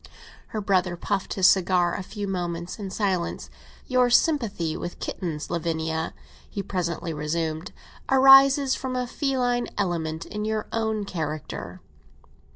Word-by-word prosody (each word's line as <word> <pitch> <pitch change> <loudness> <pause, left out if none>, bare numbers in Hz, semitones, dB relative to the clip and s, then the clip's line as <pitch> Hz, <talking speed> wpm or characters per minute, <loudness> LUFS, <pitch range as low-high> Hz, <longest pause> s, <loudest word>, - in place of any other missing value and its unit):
Her 215 - -4
brother 185 -3 +1
puffed 195 +2 -2
his 190 - +2
cigar 180 -2 +4
a - - -3
few 205 +2 -5
moments 175 0 -3
in 200 -2 -4
silence. 190 -3 -2 0.3
"Your 255 -2 +3
sympathy 230 - +2
with 175 - -6
kittens, 160 -4 -4
Lavinia," 160 -1 -2 0.3
he 200 - -4
presently 170 -3 -3
resumed, 155 +2 -2 0.4
"arises 270 0 +7
from 260 -1 -3
a 250 0 0
feline 245 -2 0
element 165 -4 -2
in 210 0 -5
your 215 0 -1
own 220 -2 -1
character." 155 -5 -5
190 Hz, 130 wpm, -25 LUFS, 170-230 Hz, 0.4 s, arises